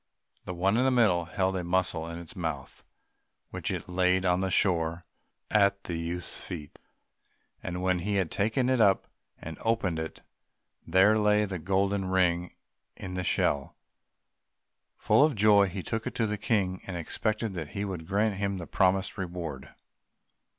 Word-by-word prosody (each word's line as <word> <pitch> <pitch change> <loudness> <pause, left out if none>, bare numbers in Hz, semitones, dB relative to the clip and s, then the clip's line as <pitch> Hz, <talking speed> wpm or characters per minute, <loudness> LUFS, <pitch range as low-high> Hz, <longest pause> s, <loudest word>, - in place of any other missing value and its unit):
The 90 - -5
one 95 +5 +2
in 125 - +3
the 130 - +4
middle 105 -9 +3
held 95 +1 -1
a 90 - -2
mussel 85 -2 0
in 85 - -6
its 85 -2 -10
mouth, 80 -6 -5 0.7
which - - -4
it - - -4
laid 90 +1 +2
on 90 0 +2
the 95 - 0
shore 85 -3 +1 0.5
at 100 -2 +3
the 85 - -5
youth's 85 +1 -4
feet, 75 -5 -8 0.8
and 90 0 -4
when 95 -1 +2
he 100 +4 -2
had 95 -4 0
taken 110 +6 +1
it 130 -2 +2
up 100 -3 +4 0.3
and 80 -1 -8
opened 105 -8 0
it, 80 0 -6 0.7
there 95 +5 +5
lay 105 0 +3
the 95 -3 -5
gold 95 +4 +1
ring 95 -3 0 0.4
in 90 -1 -6
the 90 0 -2
shell. 70 -5 0 1.2
Full - - +4
of 150 -3 +2
joy 100 -1 +5
he 95 0 -5
took 110 0 -3
it - - -5
to 115 - +1
the 105 -1 -1
King, 100 -3 0
and 90 -2 -4
expected 110 +5 -2
that 80 -4 -5
he 100 - -1
would 90 -5 -6
grant 100 +1 +1
him 100 -1 -1
the 90 - -6
promised 95 +3 +1
reward. 85 -7 -5
95 Hz, 170 wpm, -28 LUFS, 85-100 Hz, 1.2 s, there